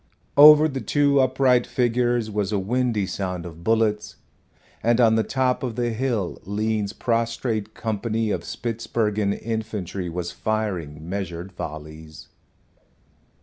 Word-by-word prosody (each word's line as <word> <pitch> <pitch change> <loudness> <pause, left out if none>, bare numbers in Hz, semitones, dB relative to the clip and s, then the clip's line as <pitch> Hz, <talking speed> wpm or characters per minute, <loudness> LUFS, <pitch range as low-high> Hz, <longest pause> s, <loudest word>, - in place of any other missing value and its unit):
Over 150 +2 +9
the 135 -3 -4
two 145 -1 +2
upright 130 -1 +3
figures 120 -2 0
was 105 -1 -1
a 105 - +1
windy 115 +1 0
sound 90 -2 -4
of 85 -1 -10
bullets, 110 -1 +1 0.7
and 120 +1 +2
on 115 -2 +5
the 110 - +3
top 130 +2 0
of 125 -4 -3
the 120 -1 -1
hill 115 -6 -2
Lean's 105 +1 -1
prostrate 115 -1 -2
company 110 0 -2
of - - -1
Spitzbergen 110 -3 -2
infantry 105 -5 -4
was 85 0 -4
firing 90 -9 -3
measured 90 -1 -5
volleys. 80 -1 -9
110 Hz, 125 wpm, -23 LUFS, 95-120 Hz, 0.7 s, Over